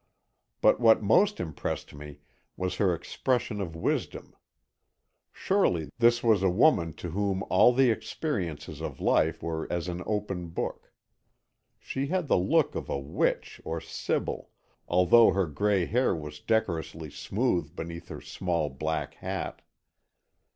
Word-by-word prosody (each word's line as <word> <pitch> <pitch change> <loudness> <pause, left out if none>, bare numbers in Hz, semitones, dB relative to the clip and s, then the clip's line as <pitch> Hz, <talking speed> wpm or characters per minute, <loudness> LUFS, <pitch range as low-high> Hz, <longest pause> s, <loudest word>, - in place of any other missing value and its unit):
But - - +5
what 115 -2 +5
most 200 - +3
impressed 80 -3 -4
me 75 0 -10 0.4
was 90 0 -2
her 95 -3 +3
expression 120 +4 -2
of 85 -4 -5
wisdom. 80 - -3 1.0
Surely, 90 - 0
this 120 0 +4
was 110 -5 +4
a 95 - +3
woman 90 - +3
to 85 - -7
whom 100 +1 -1
all 95 +6 +6
the 130 0 +4
experiences 100 - -4
of - - -5
life 80 +1 +2
were 80 -1 -3
as 85 0 -2
an 90 0 -4
open 100 -5 -2
book. 80 - -5 0.9
She 135 +1 -4
had 180 0 -1
the - - +3
look 90 - +2
of - - -5
a - - -1
witch 70 0 -2
or 80 0 -3
sibyl, 80 - -3 0.4
although 90 +6 +5
her 95 -1 +1
gray 95 +5 +1
hair 125 +2 +1
was 75 -2 -7
decorously 80 -8 -1
smooth 85 - -1
beneath 85 0 -7
her - - -8
small 85 -6 -2
black 80 +4 -3
hat. - - -5
90 Hz, 140 wpm, -28 LUFS, 80-110 Hz, 1.0 s, all